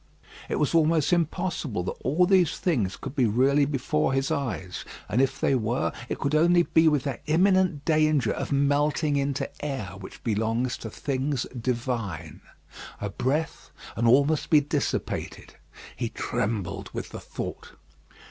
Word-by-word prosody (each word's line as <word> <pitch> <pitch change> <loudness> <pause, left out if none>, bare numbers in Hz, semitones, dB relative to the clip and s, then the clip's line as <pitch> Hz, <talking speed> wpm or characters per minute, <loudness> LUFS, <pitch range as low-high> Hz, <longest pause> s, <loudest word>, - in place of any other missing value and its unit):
It - - 0
was 150 - 0
almost 160 0 +3
impossible 165 - -1
that - - -2
all 155 +8 +3
these 180 -4 +3
things 115 - 0
could 135 +1 -7
be 125 -4 +3
really 135 +6 +3
before 135 - 0
his 135 0 0
eyes; 95 -9 -3 0.2
and 120 +6 +2
if 135 - 0
they - - +2
were, 120 0 0 0.2
it - - -2
could 140 +1 -2
only 175 +3 +5
be 160 -1 +3
with 150 -4 +3
that 140 - -4
imminent 180 -2 +3
danger 155 -3 +3
of - - -4
melting 145 +2 +2
into 140 -1 0 0.2
air 135 -11 -3
which 95 - -11
belongs 115 +3 0
to 110 - -7
things 135 +2 -2
divine. 120 -3 -3 0.6
A 100 - -4
breath, 145 +9 -2 0.3
and 115 +1 +1
all 135 +4 +6
must 155 0 -1
be 155 - +7
dissipated. 145 0 -3 0.4
He - - -2
trembled 100 -3 -3
with - - -5
the - - -7
thought. - - -7
140 Hz, 155 wpm, -26 LUFS, 120-155 Hz, 0.6 s, be